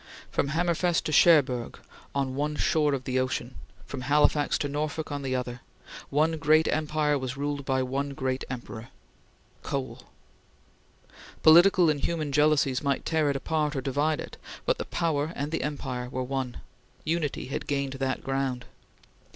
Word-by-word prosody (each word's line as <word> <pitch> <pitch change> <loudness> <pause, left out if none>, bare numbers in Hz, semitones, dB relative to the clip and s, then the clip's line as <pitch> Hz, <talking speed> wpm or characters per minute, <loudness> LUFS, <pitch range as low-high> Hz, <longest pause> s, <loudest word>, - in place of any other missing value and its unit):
From - - 0
Hammerfest 170 +3 +1
to - - -3
Cherbourg 140 -7 +4 0.4
on 135 -2 0
one 150 +2 -1
shore 150 -2 +2
of 130 - -5
the 130 -1 0
ocean 130 -1 -2 0.3
from - - -6
Halifax 145 +2 +3
to 145 - -2
Norfolk 150 +2 -3
on 145 -1 -3
the 130 -1 -2
other 125 -1 -4 0.5
one 155 +3 +1
great 155 +2 +4
empire 150 -1 +1
was 130 0 -4
ruled 145 0 -3
by 130 -1 +1
one 140 +2 -3
great 130 0 -2
emperor 120 -2 -7 0.7
Coal. 135 -2 -4 1.4
Political 175 +1 +7
and 145 - -2
human 155 -1 -2
jealousies 145 -3 +3
might 140 -1 -1
tear 160 -3 +1
it 140 - 0
apart 150 +1 -1
or 135 - -1
divide 145 +3 0
it, - - -7 0.3
but - - +1
the - - -3
power 160 -2 -1
and 145 +2 -3
the 165 - -1
empire 130 -4 -4
were 130 0 -3
one. 130 -1 -4 0.4
Unity 155 -5 -2
had - - -4
gained 140 -1 -1
that 135 0 -2
ground. 135 -2 -2
140 Hz, 160 wpm, -27 LUFS, 130-155 Hz, 1.4 s, Political